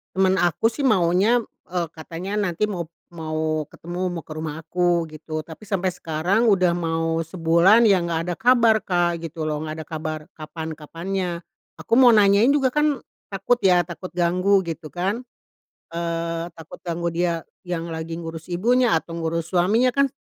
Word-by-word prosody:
Temen 190 0 +3
aku 175 +5 +2
sih 235 +5 -3
maunya, 200 +1 +3 0.3
eee, 175 -2 -1
katanya 170 +5 -6
nanti 205 -1 0
mau 185 -5 -3 0.3
mau 155 -1 -2
ketemu 175 +2 -5
mau 170 -2 -5
ke 155 - -9
rumah 155 0 -4
aku 175 0 +1
gitu, 155 0 -5
tapi 160 +6 -12
sampai 190 -2 0
sekarang 175 +8 0
udah 185 -3 +3
mau 165 -1 -1
sebulan 170 +6 +4
ya 195 -3 +5
nggak 170 -1 -1
ada 175 - -1
kabar, 235 -1 +5
Kak, 175 -2 +1
gitu 165 0 -5
loh 150 -1 -1
nggak 155 0 -5
ada - - -28
kabar 155 -1 -4 0.2
kapan 160 +1 -6
kapannya. 175 +4 -4 0.5
Aku - - 0
mau 250 -2 +8
nanyain 205 +2 +5
juga 270 -3 +2
kan 300 -3 +2 0.3
takut 195 +5 +1
ya, 180 -2 +5
takut 180 +1 -8
ganggu 180 +3 +3
gitu 165 -1 -5
kan 195 +7 -2 0.7
eee, 170 0 -2
takut 160 -1 -11
ganggu 170 0 -2
dia 170 -1 -1 0.2
yang 170 -1 -3
lagi 160 0 -5
ngurus 165 -1 -7
ibunya 235 +5 +3
atau 165 +1 -3
ngurus 165 0 -2
suaminya 205 +8 +3
kan, 275 +2 +3
175 Hz, 165 wpm, -23 LUFS, 165-195 Hz, 0.7 s, mau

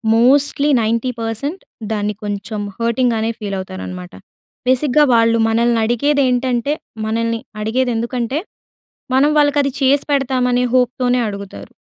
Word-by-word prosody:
Mostly 280 +4 +3
90% 230 - -2 0.3
దాన్ని 210 -1 -1
కొంచెం 205 +1 -4 0.2
హర్టింగ్‌గానే 230 -1 0
feel 200 -2 -4
అవుతారనమాట. 95 - -7 0.6
బేసిక్‌గా 265 +3 +3
వాళ్ళు 230 0 +4
మనల్ని 235 +1 +2
అడిగేదేంటంటే, 255 +1 +1 0.3
మనల్ని 230 +1 -1 0.2
అడిగేది 245 +3 0
ఎందుకంటే, 235 +4 -2 0.8
మనం 285 +3 +4
వాళ్ళకి 290 0 +3
అది 275 -2 -2
చేసి 275 +1 +3
పెడతామనే 250 -2 +1
హోప్‌తోనే 250 0 +2
అడుగుతారు. 200 -1 -8
240 Hz, 105 wpm, -18 LUFS, 225-260 Hz, 0.8 s, వాళ్ళు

